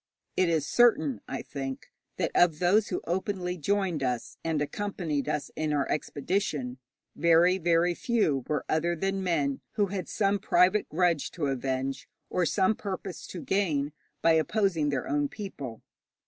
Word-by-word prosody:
It 185 Hz, -2 st, +3 dB
is 160 Hz, -3 st, +1 dB
certain, 240 Hz, -, +3 dB
I -, -, -4 dB
think, 135 Hz, -1 st, -6 dB, 0.3 s
that -, -, 0 dB
of 170 Hz, -3 st, +4 dB
those 195 Hz, +6 st, +3 dB
who -, -, -3 dB
openly 180 Hz, 0 st, -2 dB
joined 185 Hz, -2 st, 0 dB
us 125 Hz, -3 st, -2 dB
and 160 Hz, -2 st, 0 dB
accompanied 150 Hz, -2 st, -2 dB
us 150 Hz, -1 st, -2 dB
in 155 Hz, -1 st, -1 dB
our 140 Hz, -2 st, +1 dB
expedition, 145 Hz, -5 st, -2 dB, 0.4 s
very, 170 Hz, +3 st, +4 dB
very 170 Hz, 0 st, +3 dB
few 170 Hz, -, +1 dB
were 150 Hz, -, -1 dB
other 170 Hz, +2 st, +1 dB
than 195 Hz, +3 st, -1 dB
men 145 Hz, -7 st, 0 dB
who 205 Hz, -, +2 dB
had 190 Hz, -2 st, -3 dB
some 200 Hz, -1 st, +1 dB
private 190 Hz, +2 st, +3 dB
grudge 170 Hz, -2 st, +1 dB
to 165 Hz, -5 st, -2 dB
avenge, 135 Hz, 0 st, -2 dB, 0.2 s
or 180 Hz, -2 st, +2 dB
some 190 Hz, +4 st, +3 dB
purpose 195 Hz, -3 st, -6 dB
to 175 Hz, -, -7 dB
gain, 155 Hz, -8 st, 0 dB, 0.3 s
by 165 Hz, -, +6 dB
opposing 165 Hz, -1 st, +2 dB
their 140 Hz, -3 st, -2 dB
own 145 Hz, 0 st, +1 dB
people. 140 Hz, -, -7 dB
170 Hz, 155 wpm, -28 LUFS, 145-190 Hz, 0.4 s, by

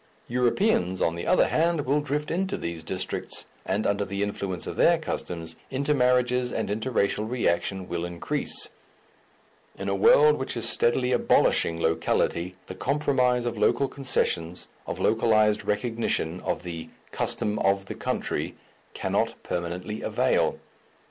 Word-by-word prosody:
Europeans, 120 Hz, -, +1 dB
on 85 Hz, -, +1 dB
the 85 Hz, -, -5 dB
other 185 Hz, -, +4 dB
hand, 165 Hz, 0 st, +2 dB
will 145 Hz, +3 st, +2 dB
drift 145 Hz, +1 st, -2 dB
into 190 Hz, +3 st, -1 dB
these 85 Hz, -1 st, -4 dB
districts, 90 Hz, +3 st, -4 dB, 0.2 s
and 100 Hz, +3 st, 0 dB
under 100 Hz, 0 st, +1 dB
the 100 Hz, +1 st, -2 dB
influence 100 Hz, -3 st, -3 dB
of -, -, -5 dB
their -, -, +5 dB
customs, 80 Hz, -2 st, -4 dB
intermarriages 125 Hz, -3 st, +2 dB
and 110 Hz, -, -2 dB
interracial 110 Hz, -1 st, 0 dB
reaction 95 Hz, -5 st, 0 dB
will 85 Hz, -1 st, -3 dB
increase; 85 Hz, -1 st, -2 dB, 1.1 s
in -, -, -5 dB
a 100 Hz, -, +1 dB
world 150 Hz, +10 st, +5 dB
which 130 Hz, -2 st, -2 dB
is 115 Hz, 0 st, -1 dB
steadily 125 Hz, +2 st, +2 dB
abolishing 85 Hz, -8 st, +3 dB
locality, 85 Hz, +2 st, 0 dB
the -, -, -7 dB
compromise 130 Hz, -3 st, +1 dB
of 120 Hz, -3 st, -3 dB
local 120 Hz, +5 st, +3 dB
concessions, 90 Hz, -11 st, -1 dB, 0.2 s
of -, -, -3 dB
localized 110 Hz, -2 st, +3 dB
recognition 105 Hz, -6 st, -1 dB
of -, -, -3 dB
the 85 Hz, -2 st, -6 dB, 0.2 s
"custom 105 Hz, 0 st, -1 dB
of 95 Hz, 0 st, +2 dB
the -, -, -5 dB
country," -, -, -2 dB, 0.4 s
cannot -, -, 0 dB
permanently 90 Hz, +5 st, -4 dB
avail. -, -, +1 dB
110 Hz, 135 wpm, -26 LUFS, 90-125 Hz, 1.1 s, their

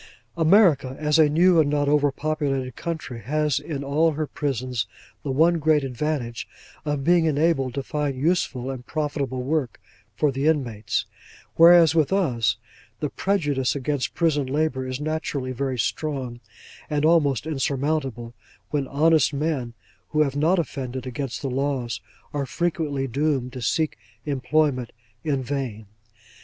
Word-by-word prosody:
America, 165 Hz, -6 st, +4 dB
as 150 Hz, +1 st, +2 dB
a 155 Hz, -2 st, +6 dB
new 170 Hz, +3 st, +5 dB
and 150 Hz, -2 st, +3 dB
not 145 Hz, -1 st, +1 dB
over 145 Hz, -1 st, +3 dB
populated 140 Hz, -4 st, -2 dB
country, 155 Hz, -8 st, -5 dB
has 150 Hz, +4 st, 0 dB
in 140 Hz, -4 st, -5 dB
all 155 Hz, +4 st, +2 dB
her 155 Hz, +1 st, -2 dB
prisons, 130 Hz, -5 st, -2 dB, 0.3 s
the 145 Hz, -, -5 dB
one 165 Hz, +5 st, +3 dB
great 155 Hz, -1 st, +3 dB
advantage, 130 Hz, -2 st, -3 dB, 0.4 s
of 145 Hz, -2 st, -1 dB
being 170 Hz, +1 st, +4 dB
enabled 145 Hz, -4 st, +1 dB
to 140 Hz, -, -2 dB
find 145 Hz, -2 st, -2 dB
useful 135 Hz, -4 st, 0 dB
and 125 Hz, -2 st, -8 dB
profitable 140 Hz, -4 st, -2 dB
work 140 Hz, -4 st, -1 dB, 0.4 s
for 150 Hz, +5 st, +2 dB
the 135 Hz, +3 st, -1 dB
inmates; 115 Hz, -9 st, 0 dB, 0.5 s
whereas, 165 Hz, -1 st, +7 dB
with 160 Hz, -1 st, +2 dB
us, 130 Hz, -, +1 dB, 0.4 s
the 150 Hz, -3 st, -2 dB
prejudice 145 Hz, -10 st, 0 dB
against 140 Hz, -3 st, -2 dB
prison 150 Hz, -5 st, +1 dB
labour 135 Hz, -2 st, -1 dB
is 130 Hz, +1 st, -4 dB
naturally 150 Hz, -4 st, -2 dB
very 130 Hz, 0 st, -2 dB
strong, 130 Hz, -1 st, -2 dB, 0.5 s
and 150 Hz, -1 st, +1 dB
almost 145 Hz, -6 st, +3 dB
insurmountable, 135 Hz, -5 st, -2 dB, 0.4 s
when 145 Hz, -3 st, 0 dB
honest 155 Hz, +1 st, +3 dB
men 140 Hz, -6 st, -2 dB, 0.3 s
who 155 Hz, -, +1 dB
have 140 Hz, -2 st, +1 dB
not 160 Hz, +6 st, +3 dB
offended 130 Hz, -5 st, -3 dB
against 130 Hz, +1 st, -4 dB
the -, -, -1 dB
laws 130 Hz, -2 st, -2 dB, 0.3 s
are 140 Hz, -2 st, -2 dB
frequently 155 Hz, -5 st, -1 dB
doomed 135 Hz, -1 st, -1 dB
to 130 Hz, -, -6 dB
seek 120 Hz, 0 st, 0 dB, 0.3 s
employment 135 Hz, -2 st, 0 dB, 0.3 s
in 140 Hz, -4 st, 0 dB
vain. 125 Hz, -5 st, -4 dB
145 Hz, 145 wpm, -24 LUFS, 130-155 Hz, 0.5 s, whereas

